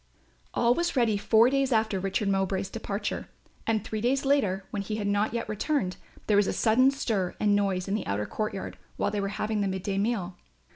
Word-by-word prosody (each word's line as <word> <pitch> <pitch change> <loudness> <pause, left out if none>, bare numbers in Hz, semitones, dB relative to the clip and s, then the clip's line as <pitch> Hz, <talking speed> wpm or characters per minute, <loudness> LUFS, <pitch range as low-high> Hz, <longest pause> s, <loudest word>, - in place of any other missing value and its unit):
All 235 0 +4
was 345 +3 -1
ready 235 -4 +3
four 220 +4 +4
days 275 -1 +1
after 220 -3 +2
Richard 195 +2 -1
Mowbray's 195 0 0
departure 210 -2 -3 0.4
and, 220 -2 +1
three 215 -1 -3
days 265 +4 +1
later, 200 -9 +2
when 205 - -2
he 215 +2 -4
had 210 -1 -3
not 205 +1 +1
yet 230 0 -3
returned, 215 -2 -1 0.3
there 210 - +3
was 205 -1 +4
a - - 0
sudden 245 +4 +4
stir 220 -9 -1
and 205 -1 +3
noise 195 -2 0
in 195 - -1
the 215 - -2
outer 100 +1 -1
courtyard 215 - -4 0.2
while - - 0
they 205 -1 -1
were 195 - -1
having 215 -1 -1
the 200 - +1
mid 190 -1 -3
day 195 -1 -1
meal. 200 -4 -1
210 Hz, 210 wpm, -28 LUFS, 195-230 Hz, 0.4 s, All